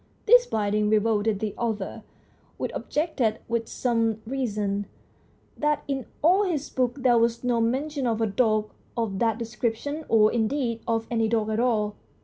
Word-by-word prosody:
This -, -, +6 dB
binding 210 Hz, -1 st, 0 dB
revolted 215 Hz, -1 st, +2 dB
the 215 Hz, -1 st, -2 dB
author, 220 Hz, -5 st, -3 dB, 0.6 s
who -, -, -2 dB
objected, 290 Hz, -8 st, -1 dB
with 230 Hz, -1 st, -1 dB
some 230 Hz, -3 st, 0 dB
reason, 210 Hz, -5 st, -2 dB, 0.7 s
that 300 Hz, 0 st, 0 dB
in 270 Hz, -3 st, -3 dB, 0.2 s
all 365 Hz, +5 st, +5 dB
his 335 Hz, -8 st, -2 dB
book 255 Hz, +1 st, -1 dB
there 240 Hz, -2 st, +5 dB
was 235 Hz, +1 st, +1 dB
no 240 Hz, -2 st, +1 dB
mention 270 Hz, +4 st, -1 dB
of 225 Hz, -1 st, 0 dB
a 225 Hz, -, +2 dB
dog 215 Hz, 0 st, +1 dB, 0.3 s
of 215 Hz, -5 st, -1 dB
that 225 Hz, -2 st, +2 dB
description, 240 Hz, +6 st, -3 dB
or, 215 Hz, -1 st, +5 dB
indeed, 230 Hz, 0 st, 0 dB
of 225 Hz, -1 st, 0 dB
any 225 Hz, -1 st, +2 dB
dog 220 Hz, -1 st, 0 dB
at 215 Hz, -, 0 dB
all. 215 Hz, -4 st, +1 dB
230 Hz, 155 wpm, -26 LUFS, 215-255 Hz, 0.7 s, This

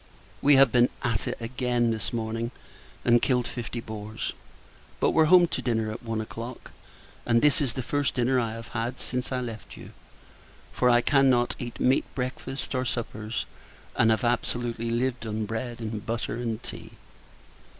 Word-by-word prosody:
We 145 Hz, 0 st, +6 dB
have 135 Hz, -2 st, +7 dB
been 120 Hz, +1 st, +5 dB
at 115 Hz, -6 st, 0 dB
it -, -, -2 dB
again, 120 Hz, 0 st, 0 dB
this 110 Hz, -2 st, -1 dB
morning, 115 Hz, 0 st, -2 dB, 0.6 s
and 120 Hz, 0 st, +5 dB
killed 125 Hz, -2 st, +2 dB
fifty 120 Hz, 0 st, -5 dB
boars; 110 Hz, -1 st, -5 dB, 0.7 s
but -, -, +3 dB
were 160 Hz, -, +5 dB
home 175 Hz, +2 st, +7 dB
to -, -, -2 dB
dinner, 110 Hz, -3 st, 0 dB
at 110 Hz, -, -7 dB
one 115 Hz, -2 st, -3 dB
o'clock: 115 Hz, +3 st, -7 dB, 0.5 s
and 115 Hz, -1 st, +3 dB
this 150 Hz, +3 st, +4 dB
is 130 Hz, -5 st, 0 dB
the 130 Hz, -, -3 dB
first 145 Hz, +3 st, 0 dB
dinner 125 Hz, +1 st, +2 dB
I 115 Hz, -2 st, -1 dB
have 115 Hz, 0 st, -8 dB
had, 120 Hz, +2 st, -3 dB
since 125 Hz, +1 st, -2 dB
I 130 Hz, -1 st, 0 dB
left 115 Hz, -3 st, -7 dB
you; -, -, -11 dB, 0.8 s
for 125 Hz, -, +3 dB
I 120 Hz, 0 st, +5 dB
cannot 130 Hz, -3 st, +4 dB
eat 120 Hz, -1 st, -6 dB
meat 130 Hz, +2 st, +3 dB
breakfasts 130 Hz, +2 st, -3 dB
or 130 Hz, -1 st, 0 dB
suppers, 115 Hz, -2 st, -3 dB, 0.5 s
and 115 Hz, -, +4 dB
have 110 Hz, +3 st, +2 dB
absolutely 120 Hz, -1 st, -1 dB
lived 120 Hz, 0 st, -1 dB
on 110 Hz, 0 st, -2 dB
bread 115 Hz, +2 st, -4 dB
and 110 Hz, -2 st, -4 dB
butter 115 Hz, 0 st, -3 dB
and 115 Hz, -2 st, -3 dB
tea. -, -, -8 dB
120 Hz, 170 wpm, -27 LUFS, 115-125 Hz, 0.8 s, have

